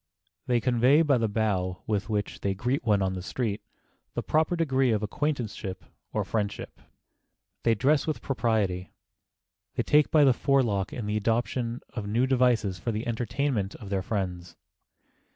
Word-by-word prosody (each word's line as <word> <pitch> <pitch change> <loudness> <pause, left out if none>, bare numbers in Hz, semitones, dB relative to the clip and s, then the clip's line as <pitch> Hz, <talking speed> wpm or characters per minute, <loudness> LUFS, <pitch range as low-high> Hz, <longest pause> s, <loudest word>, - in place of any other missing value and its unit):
They 120 -1 +3
convey 125 +6 +4
by 140 -5 +3
the 115 - +1
bow 95 -4 -1
with 105 +1 -1
which 105 -1 -2
they 100 -1 0
greet 125 +7 -1
one 105 -4 +2
on 95 0 0
the 95 - -4
street 110 +1 -2 0.5
the - - -2
proper 160 +3 +2
degree 135 -6 +2
of 110 -2 +1
acquaintanceship 110 -6 -3 0.3
or - - 0
friendship. 105 -2 -3 0.8
They 115 -1 +3
dress 140 +8 +2
with 155 - -1
propriety. 110 -8 -1 0.8
They 120 - 0
take 150 +3 +4
time - - -39
by 155 -2 +6
the 135 -2 +6
forelock 120 -8 +1
in 115 - -5
the 105 +1 -1
adoption 115 +2 -1
of 110 -4 -4
new 115 +5 +2
devices 125 -8 +2
for 115 - -2
the 110 +1 -3
entertainment 115 -2 -1
of 100 -3 -10
their 95 -1 +1
friends. 90 -4 -3
115 Hz, 165 wpm, -27 LUFS, 100-130 Hz, 0.8 s, by